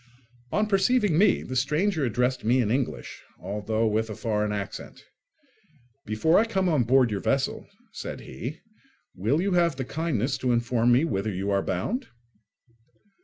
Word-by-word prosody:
On 210 - +2
perceiving 205 -1 +2
me, 195 +4 +4
the 130 - -6
stranger 150 +6 +1
addressed 125 +2 0
me 120 +4 +3
in 110 -4 +1
English, 130 0 -3 0.2
although 105 +3 -2
with 110 +1 0
a 110 - -5
foreign 105 -2 -1
accent. 100 -1 -6 1.0
"Before 110 - +3
I 225 - +3
come 195 -4 0
on 150 -8 +2
board 125 -1 +4
your 100 - -1
vessel," 135 +5 -1 0.2
said - - -6
he, 120 - -7 0.5
"will 120 - 0
you 200 - 0
have 170 -4 +2
the 130 -1 -4
kindness 140 -4 -1
to 125 -1 +1
inform 120 0 +2
me 130 +6 +4
whither 105 -8 -1
you 100 +1 -2
are 100 0 +2
bound?" 205 - -2
125 Hz, 160 wpm, -26 LUFS, 110-165 Hz, 1.0 s, me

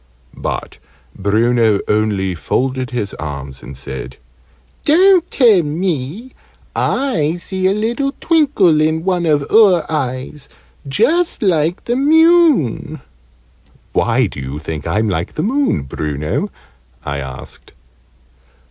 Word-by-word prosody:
But - - -5 0.4
Bruno 110 +1 +2
only 105 -3 0
folded 130 - -2
his 110 -5 -3
arms, 70 -2 -6
and 70 - -10
said 65 -1 -7 0.7
"Don't 360 +2 +4
tell 225 -8 +4
me. 165 - -3 0.4
I 170 - 0
see 185 +2 -2
a - - +3
little 235 +6 -1
twinkle 270 - +3
in 160 +1 +1
one 180 -2 0
of 145 -2 +2
oor 195 -7 +5
eyes 135 0 -4 0.4
just 280 - +1
like 170 -3 +1
the 240 - -1
moon." 300 - +3 0.9
"Why - - +2
do - - -6
you 65 +2 -5
think 80 -1 -6
I'm 110 +2 0
like 90 -3 -2
the 155 - -3
moon, 265 - 0
Bruno?" 75 +2 -3 0.6
I 70 -1 -3
asked. 65 -2 -10
155 Hz, 115 wpm, -17 LUFS, -, 0.9 s, oor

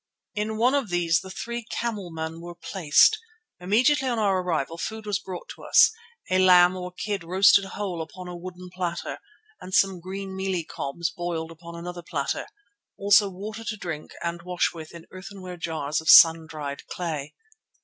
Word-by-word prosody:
In 215 +1 -2
one 245 +4 +3
of 275 -7 0
these 170 -1 +2
the 190 - -10
three 235 +5 -5
camelmen 170 -8 -4
were 175 0 -9
placed. 180 - +3 0.4
Immediately 250 +10 +2
on 240 -2 0
our 195 -4 +2
arrival 165 -2 -2
food 220 +3 -5
was 205 -1 -1
brought 185 -2 -8
to - - -10
us, - - +6 0.4
a 185 - +4
lamb 180 -1 +6
or 180 0 -6
kid 195 +1 -4
roasted 190 +3 +5
whole 190 -3 -4
upon 180 +3 -8
a 180 - -7
wooden 180 +1 -9
platter, 175 -2 -4 0.4
and 185 - -5
some 195 -2 +3
green 190 +2 -6
mealie 190 -2 -1
cobs 165 +5 -4
boiled 170 -2 -4
upon 170 +1 -11
another 175 +1 -7
platter; 170 - -3 0.5
also 205 0 +5
water 210 +4 -7
to 215 -1 -4
drink 165 -6 -6
and 170 0 -3
wash 180 +1 0
with 160 -2 -9
in 170 -1 -11
earthenware 185 -1 -9
jars 160 -2 -2
of 160 - -3
sun 165 -1 +8
dried 145 -3 -6
clay. 155 -5 -4
180 Hz, 170 wpm, -25 LUFS, 170-195 Hz, 0.5 s, sun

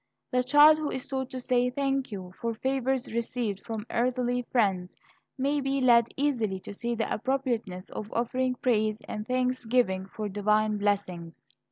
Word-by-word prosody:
The 250 -1 +3
child 295 +4 +7
who 305 -2 -2
is 260 - -4
taught 265 -1 -3
to 260 -1 -5
say 250 0 +1
"thank 270 -1 -1
you" 185 -3 -7
for 230 -1 -1
favors 265 +1 -1
received 230 -3 -2
from 220 0 -6
earthly 245 0 0
friends, 190 -7 +1 0.4
may 280 +2 +1
be 270 0 0
led 235 -3 +5
easily 235 -9 0
to - - -8
see 235 +3 -3
the 225 - -1
appropriateness 235 -7 -2
of 215 0 -6
offering 255 +2 0
praise 220 -4 +1
and 215 0 -5
thanksgiving 250 -6 +1
for 210 +1 -5
divine 210 +1 +1
blessings. 185 -5 -2
240 Hz, 160 wpm, -28 LUFS, 210-260 Hz, 0.4 s, child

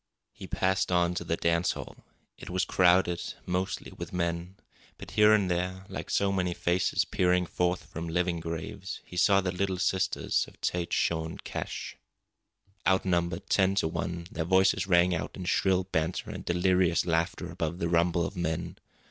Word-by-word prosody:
He - - -10
passed 95 0 0
on 90 -1 +3
to 90 - -3
the 85 - -1
dance 85 +1 +1
hall. - - -8 0.4
It - - -10
was 90 +1 0
crowded, 90 -1 +2
mostly 90 +1 -2
with - - -8
men. 85 +1 -2 0.4
But - - -10
here 105 0 +5
and 105 -3 +4
there, 90 +2 -2
like - - -6
so 100 -1 +2
many 90 -2 0
faces 90 +1 +1
peering 90 0 +2
forth 90 +1 -1
from 85 +1 -6
living 90 0 0
graves, 85 +3 -5
he - - -11
saw 95 +2 +4
the 90 -1 -1
Little 95 0 -1
Sisters 95 +1 0
of - - -17
Tête 90 -1 -1
Jaune 80 -1 0
Cache. - - -5 0.9
Outnumbered 90 -2 +1
ten 95 0 +3
to 90 - +2
one, 85 +1 -4
their 80 - -2
voices 95 +2 +3
rang 90 -1 +4
out 80 - -3
in 95 - -6
shrill 95 0 +2
banter 85 -2 -2
and - - -7
delirious 90 -1 +2
laughter 80 -1 -1
above 80 +1 -3
the 85 - -1
rumble 85 0 +2
of 100 - -6
men. 85 0 -3
90 Hz, 170 wpm, -29 LUFS, 85-95 Hz, 0.9 s, here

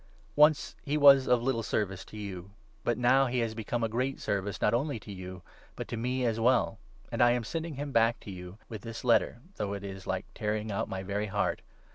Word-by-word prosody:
Once 150 0 +4
he 145 +2 -1
was 140 -2 +7
of 125 -1 +3
little 125 -3 +1
service 95 -4 -2
to 110 - -12
you, 95 -3 -6 0.3
but 120 -2 +1
u - - -6
now 135 +2 +5
he 125 +1 -2
has 115 -2 0
become 115 +2 -3
of 110 - 0
great 130 +4 -1
service, 100 0 -2
not 105 - +2
only 135 +1 0
to 105 - -10
you, 95 -1 -8 0.3
but - - -5
to - - -4
me 125 +2 -1
as 115 -1 0
well; 115 -2 +2 0.3
and 115 -1 -1
I 120 0 +6
am 120 -1 -1
sending 165 +5 -4
him 145 +1 -4
back 115 -1 +3
to 100 - -8
you 90 +1 -9
with 110 -3 -7
this 115 -1 -7
12 - - -7
letter 115 - +4
— 195 - -28
though 100 -1 -2
it 100 -1 -5
is 95 -1 -7
like 95 +1 -2
tearing 105 0 -2
out 100 - -2
my 95 0 -4
very 100 +2 -2
heart. 105 +1 -1
115 Hz, 240 wpm, -30 LUFS, 100-125 Hz, 0.3 s, was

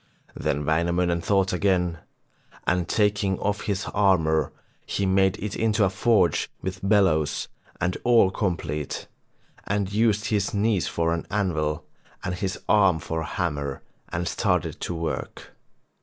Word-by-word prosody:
Then 75 +1 -2
Wainamoinen 85 +2 +1
thought 95 0 +1
again, 90 -3 +1 0.7
and 90 -1 +1
taking 100 -2 +1
off 105 0 -2
his 100 0 -1
armour 80 -6 +3 0.4
he 100 - -1
made 95 0 +3
it 105 0 -4
into 110 -1 +2
a 95 - +2
forge 95 -5 +2
with 95 0 -5
bellows 85 -8 +2 0.3
and 90 +1 0
all 115 -6 +5
complete, 85 -7 -2 0.6
and 100 -1 -1
used 110 -1 +2
his 105 -2 0
knees 105 -2 +1
for 85 0 0
an 85 - -4
anvil 80 -7 -1 0.4
and 90 - -2
his 95 +1 -3
arm 95 -5 +5
for 80 0 -3
a - - -4
hammer, 70 -5 -3 0.3
and 85 +1 -2
started - - 0
to 90 - -3
work. 80 -5 -5
95 Hz, 140 wpm, -25 LUFS, 80-100 Hz, 0.7 s, all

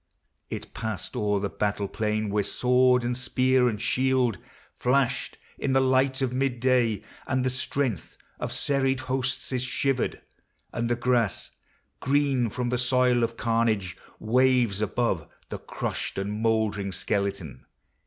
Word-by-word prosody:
It - - -7
passed 110 -4 -5
o'er 105 -1 +1
The 100 - -1
battle 105 0 -1
plain 105 0 -1
where 105 0 +2
sword 125 +3 +3
and 120 +1 -1
spear 130 0 +2
and 105 -3 -4
shield 130 -4 +1 0.3
Flashed 125 0 0 0.2
in 135 - 0
the 135 - +5
light 130 0 +2
of 125 -1 -1
midday, 125 -4 +1 0.2
and 130 -1 0
the 130 - +1
strength 130 - -2 0.2
Of - - -3
serried 135 -1 0
hosts 130 +1 -2
is 130 -2 0
shivered, 130 0 0 0.5
and 115 0 -1
the 120 - +2
grass, 120 -4 0 0.5
Green 135 -3 +2
from 120 +3 -2
the 125 0 0
soil 125 -1 +3
of 115 0 -2
carnage, 110 -6 0 0.2
waves 120 -3 +2
above 105 -6 0 0.2
The - - -5
crushed - - -4
and 100 +1 -2
moldering 110 -3 0
skeleton. 100 - -3
125 Hz, 140 wpm, -26 LUFS, 105-130 Hz, 0.5 s, the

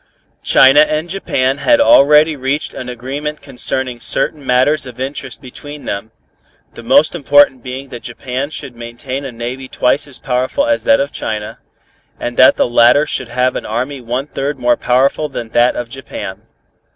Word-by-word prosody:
China 135 +2 +6
and 155 +2 +1
Japan 135 -8 -1
had 295 - +3
already 150 - +5
reached 135 +2 -2
an 125 - -7
agreement 140 +5 -5
concerning 130 -1 -2
certain 150 +4 0
matters 130 +3 +1
of 125 -1 -11
interest 135 +1 -5
between 145 +3 -10
them, 100 +2 -4 0.6
the - - -10
most 130 +6 +3
important 145 -5 +3
being 130 +2 -7
that 120 -2 -8
Japan 130 +3 -5
should 140 -4 -8
maintain 120 +3 -6
a 135 - -5
navy 120 +3 -6
twice 130 +3 0
as 140 - -5
powerful 130 - -1
as 295 -1 0
that 280 0 +4
of 280 - -1
China, 105 -1 -5 0.6
and 120 - -4
that 130 - +6
the - - +1
latter 120 +5 +4
should 130 -5 -4
have 125 0 0
an - - -4
army 130 +5 -3
one 125 +3 -3
third 145 -1 -4
more 120 -1 +2
powerful 135 +4 +1
than 120 -4 -6
that 120 +2 +2
of 120 - -4
Japan. 115 -6 -8
130 Hz, 170 wpm, -15 LUFS, 125-145 Hz, 0.6 s, China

